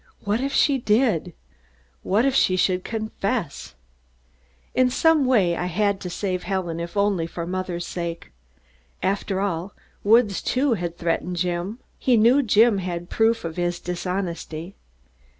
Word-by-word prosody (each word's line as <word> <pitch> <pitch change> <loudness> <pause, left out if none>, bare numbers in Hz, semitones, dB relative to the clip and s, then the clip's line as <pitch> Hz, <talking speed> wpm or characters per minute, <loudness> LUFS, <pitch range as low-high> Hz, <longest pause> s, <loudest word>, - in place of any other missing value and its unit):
What 210 +3 0
if 275 +1 -1
she 275 -1 +3
did? 210 - +1 0.7
What 215 +6 +2
if 275 - +2
she 185 -8 +3
should 185 0 +1
confess? 220 - -3 1.0
In 255 0 +3
some 315 +2 +3
way 200 -10 +3
I 180 - -2
had 200 +2 0
to 180 - -5
save 185 0 -2
Helen 180 -4 -3
if 170 +3 -6
only 200 -5 +1
for 170 0 -5
mother's 180 -1 -3
sake. 170 - -5 0.7
After 195 0 -1
all, 190 -1 -2 0.3
Woods, 215 -2 +4
too, 265 0 +1
had 175 -4 -4
threatened 175 +1 -1
Jim. 180 +4 -2 0.2
He 250 -3 +3
knew 240 +6 +5
Jim 220 -3 +4
had 175 -2 -5
proof 225 -2 +2
of 165 0 -5
his 175 0 -1
dishonesty. 180 -1 -4
190 Hz, 145 wpm, -23 LUFS, 175-225 Hz, 1.0 s, knew